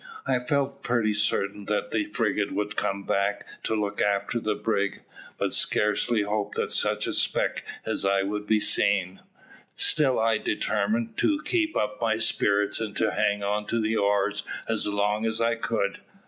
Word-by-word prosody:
I - - +1
felt 140 +2 -1
pretty 115 -3 +1
certain 105 -1 -1
that 105 0 -1
the 110 -2 0
frigate 105 -1 -1
would 105 +1 -2
come 100 0 -1
back 100 +1 0 0.2
to 110 - -1
look 105 -1 -2
after 100 +3 0
the 110 -2 -1
brig; 100 -3 -1 0.4
but - - -1
scarcely 105 +1 +2
hoped 105 0 -2
that - - -1
such - - +2
a - - -2
speck - - 0 0.2
as - - -1
I 100 0 +2
was 100 - -3
would 105 - -14
be 110 -1 +3
seen. 95 -3 +2 0.6
Still 135 -4 +3
I 110 -1 +2
determined 110 +2 -1
to 305 -1 +1
keep 330 -3 +1
up 105 +1 -2
my 110 -1 +1
spirits, 105 -2 +2
and 110 -2 -4
to 110 -1 +1
hang 100 0 0
on 105 +1 -1
to 115 - 0
the 110 0 0
oars 100 -1 +1 0.3
as - - 0
long 105 +1 0
as 110 0 -1
I 115 0 +2
could. 115 -3 -2
105 Hz, 175 wpm, -26 LUFS, 100-115 Hz, 0.6 s, be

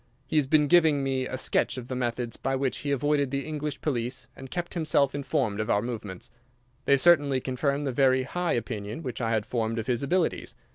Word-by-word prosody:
He 155 - -1
has 145 -3 +3
been 150 +1 +4
giving 160 -4 +4
me 130 -1 -1
a 130 - -4
sketch 130 - 0
of 125 -1 -6
the 130 - -4
methods 120 -1 -2
by 135 0 -2
which 135 -1 -1
he 145 - -4
avoided 140 0 +1
the 140 +1 -2
English 150 -1 -4
police 125 -2 -2
and 135 0 -10
kept 175 +2 -4
himself 150 -5 +2
informed 130 -6 -1
of 110 - -2
our 100 - +2
movements. 105 -6 -6 0.5
They 140 - +5
certainly 145 -4 +4
confirm 140 +3 -1
the 135 - -1
very 130 0 +3
high 175 +6 -1
opinion 110 +3 -4
which 125 -2 -5
I 115 - 0
had 110 -2 0
formed 115 -1 -2
of 115 - -2
his 120 -2 0
abilities. 170 +5 0
135 Hz, 210 wpm, -27 LUFS, 120-145 Hz, 0.5 s, They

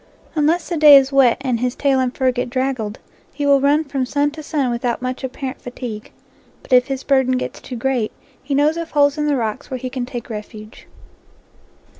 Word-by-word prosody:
Unless 315 +3 +1
the 345 - -1
day 295 -2 +9
is 270 0 +2
wet 270 -4 +4
and 255 -4 -1
his 250 +1 -1
tail 275 -2 +2
and 255 -1 0
fur 260 -1 +2
get 245 0 -3
draggled, 255 -4 -2 0.3
he 290 - -4
will 280 -1 +4
run 290 +3 +3
from 275 -3 -3
sun 290 +3 0
to 310 +1 -9
sun 290 -5 -1
without 235 0 -2
much 255 +1 -4
apparent 260 +1 -5
fatigue. 245 -4 -7 0.5
But - - -4
if 250 0 +5
his 270 -1 -4
burden 265 -2 +2
gets - - -5
too 255 - -7
great, 245 -2 -1 0.3
he 275 +1 -3
knows 300 +3 +2
of 335 -1 -4
holes 285 0 +2
in 300 - 0
the 290 - +2
rocks 225 +3 -3
where 260 - -3
he 255 0 -6
can 250 -2 -4
take 240 -2 -6
refuge. 215 0 -9
265 Hz, 210 wpm, -19 LUFS, 245-285 Hz, 0.5 s, day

